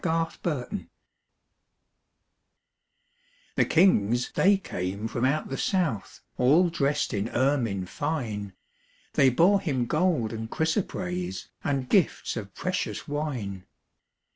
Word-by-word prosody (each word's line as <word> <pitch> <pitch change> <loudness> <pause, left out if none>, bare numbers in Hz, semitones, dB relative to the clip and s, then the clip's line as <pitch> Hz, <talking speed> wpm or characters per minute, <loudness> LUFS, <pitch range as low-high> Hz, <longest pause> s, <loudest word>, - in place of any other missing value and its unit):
Christmas 165 0 0
Carol 145 -8 -1 2.9
The - - +3
kings 125 - +3
they 200 +1 +4
came 100 - -4
from 120 +2 -1
out 145 +4 0
the 135 - -4
south, 165 - -1 0.2
All 160 +8 +5
dressed 145 -2 0
in 105 +2 -1
ermine 120 -9 +1
fine, 110 - -3 0.6
They 135 -2 +5
bore 180 +10 +4
Him 135 -10 0
gold 150 -6 +1
and 110 0 -5
chrysoprase, 180 - -2
And 135 -3 -1
gifts 185 +3 +2
of 100 -4 -6
precious 185 -1 -3
wine. 130 -11 -4
140 Hz, 110 wpm, -27 LUFS, 110-165 Hz, 2.9 s, All